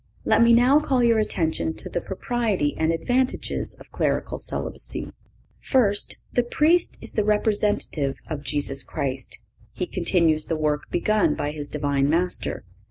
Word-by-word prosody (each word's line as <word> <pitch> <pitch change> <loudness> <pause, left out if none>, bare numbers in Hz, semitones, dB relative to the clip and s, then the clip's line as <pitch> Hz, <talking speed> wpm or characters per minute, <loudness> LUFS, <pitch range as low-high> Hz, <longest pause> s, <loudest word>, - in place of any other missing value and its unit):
Let - - +4
me 235 0 +6
now 250 +5 +6
call 265 -5 +1
your 230 -2 +4
attention 160 -6 -1
to - - -9
the 175 - -3
propriety 200 -6 -1
and 160 +1 +1
advantages 245 +11 -1
of - - -17
clerical - - -1
celibacy. - - -4 0.5
First—The 235 0 +1
Priest 310 +8 +2
is - - -10
the 215 - +1
representative 210 -9 +1
of 150 -3 -5
Jesus 140 0 -1
Christ. 135 -2 -3 0.4
He 180 - -3
continues 170 -4 +2
the 165 - -1
work 150 -1 -1
begun 205 -4 +2
by 145 -1 -2
his 145 -1 -6
Divine 140 -1 0
Master. 175 - 0
175 Hz, 145 wpm, -24 LUFS, 150-230 Hz, 0.5 s, me